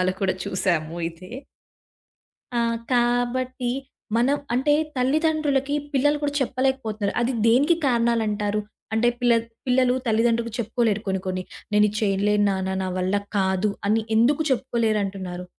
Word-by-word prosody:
సినిమాలో 185 0 +1
కూడా 190 - +2
చూసాము 170 -3 -1
ఇదే. 180 +4 -14 1.2
ఆ! 235 - +2 0.3
కాబట్టి 245 +1 0 0.5
మనం 260 +5 +3 0.2
అంటే 265 +4 +2 0.2
తల్లిదండ్రులకి 290 0 +1 0.2
పిల్లలు 290 +2 +2
కూడా 285 -1 0
చెప్పలేకపోతున్నారు. 255 -6 -1
అది 245 +2 +1
దేనికి 280 +9 +4
కారణాలంటారు? 220 -4 +1 0.3
అంటే 235 +2 +3
పిల్లద్ 230 -2 +3 0.2
పిల్లలు 255 0 +3
తల్లిదండ్రులకు 230 +1 +1
చెప్పుకోలేరు. 225 -2 0
కొన్ని 190 -1 -1
కొన్ని 185 0 -2 0.3
"నేను 210 0 +5
ఇది 210 - -5
చేయలేను 205 0 +2
నాన్న, 190 0 -2
నా 185 - -2
వల్ల 185 +2 0 0.2
కాదు" 190 +1 +1 0.2
అని 220 +2 +2
ఎందుకు 275 +7 +3
చెప్పుకోలేరు 235 -4 +1
అంటున్నారు? 185 -2 -6
230 Hz, 125 wpm, -24 LUFS, 200-255 Hz, 1.2 s, నేను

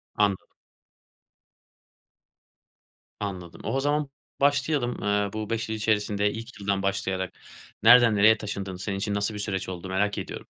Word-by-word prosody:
Anladım. 100 -2 +1 2.7
Anladım. 90 -4 -6
O 115 - -2
o 135 - +1
zaman 145 +1 0 0.3
başlayalım, 140 -3 +1
ııı, 105 -1 0
bu 110 -1 -4
5 115 -1 -2
yıl 110 - -1
içerisinde 105 -1 +1
ilk 115 +1 -8
yıldan 100 -1 -1
başlayarak 95 -1 -1 0.5
nereden 120 -1 +8
nereye 110 +2 +6
taşındın? 100 -3 -5
Senin 100 +2 -4
için 100 +1 -2
nasıl 100 +1 -1
bir 105 - -6
süreç 95 -2 -3
oldu? 90 0 -6
Merak 100 +2 0
ediyorum. - - -6
105 Hz, 140 wpm, -26 LUFS, 100-115 Hz, 2.7 s, nereden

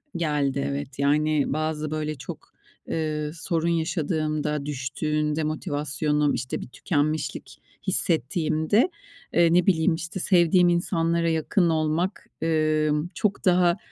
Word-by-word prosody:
Geldi, 145 -4 0
evet. 140 -1 -5
Yani, 150 0 +2
bazı 155 0 -2
böyle 155 0 -2
çok, 130 - -10 0.3
eee, 150 -1 -2
sorun 165 0 -2
yaşadığımda, 155 -3 -1
düştüğünde 150 +3 -1
motivasyonum, 150 -1 0
işte, 125 - -3
bir - - -7
tükenmişlik 155 +3 -2 0.3
hissettiğimde, 160 - +1 0.4
eee, 170 -1 +4
ne 180 0 +4
bileyim 160 -2 +3
işte, 165 +3 -6
sevdiğim 175 -1 +4
insanlara 170 -1 +1
yakın 165 +2 +1
olmak, 160 +4 -1 0.2
ımm, 155 0 +1
çok 200 +3 -1
daha 180 0 +4
155 Hz, 110 wpm, -25 LUFS, 150-170 Hz, 0.4 s, eee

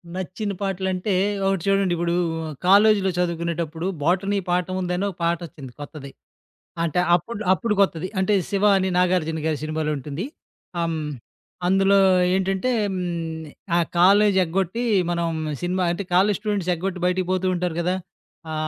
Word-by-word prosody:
నచ్చిన 190 +3 -4
పాటలంటే 190 0 -1 0.3
ఒకటి 195 -3 0
చూడండి 195 -2 +2
ఇప్పుడు, 170 0 0 0.5
కాలేజీలో 200 0 +5
చదువుకునేటప్పుడు 170 -1 -2 0.2
'బోటనీ 195 +5 +1
పాఠం 180 +1 0
ఉందని' 180 +2 -1
ఒక 180 - -9
పాటొచ్చింది 165 -6 -3
కొత్తది. 140 -2 -9 0.7
అంటే 170 +1 0 0.2
అప్పుడులో 215 +5 -2
అప్పుడు 215 +2 0
కొత్తది. 185 -2 +1
అంటే 190 +2 +1 0.2
'శివ' 205 +1 +2
అని 190 0 0
నాగార్జున 175 -3 +1
గారి 155 -3 0
సినిమాలో 155 0 -2
ఉంటుంది. 145 - -5 0.5
హ్మ్. 165 -2 -1 0.7
అందులో 195 +1 +4 0.4
ఏంటంటే, 195 +5 0 0.2
హ్మ్. 185 - -2 0.8
ఆ - - +4 0.2
కాలేజీ 200 +2 +5
ఎగ్గొట్టి 190 +7 -1 0.3
మనం 170 -1 0 0.4
సినిమా 180 +1 0
అంటే 195 +3 -4
కాలేజీ 195 +2 +3
స్టూడెంట్స్ 205 -4 -1
ఎగ్గొట్టి 185 +1 -4
బయటికి 180 0 0
పోతూ 185 0 0
ఉంటారు 175 -2 -2
గదా! 180 +2 0 0.6
ఆ! - - -3
185 Hz, 135 wpm, -23 LUFS, 170-195 Hz, 0.8 s, కాలేజీలో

